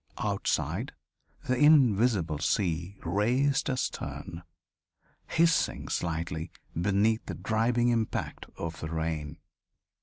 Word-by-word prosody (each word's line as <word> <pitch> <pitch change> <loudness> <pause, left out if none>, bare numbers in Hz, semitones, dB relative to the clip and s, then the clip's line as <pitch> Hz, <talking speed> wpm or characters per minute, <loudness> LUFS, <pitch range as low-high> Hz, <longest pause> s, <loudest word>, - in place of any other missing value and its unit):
Outside, - - -1 0.5
the 130 - 0
invisible 120 - +4
sea 85 +2 -1
raced 125 - +1
astern, 125 -9 -4 0.9
hissing 165 0 +2
slightly 80 -1 -2 0.2
beneath 100 +5 +2
the - - -4
driving 120 +2 +1
impact 115 -2 -2
of 80 -1 -5
the 80 - -5
rain. 80 -2 -3
100 Hz, 90 wpm, -29 LUFS, 85-120 Hz, 0.9 s, invisible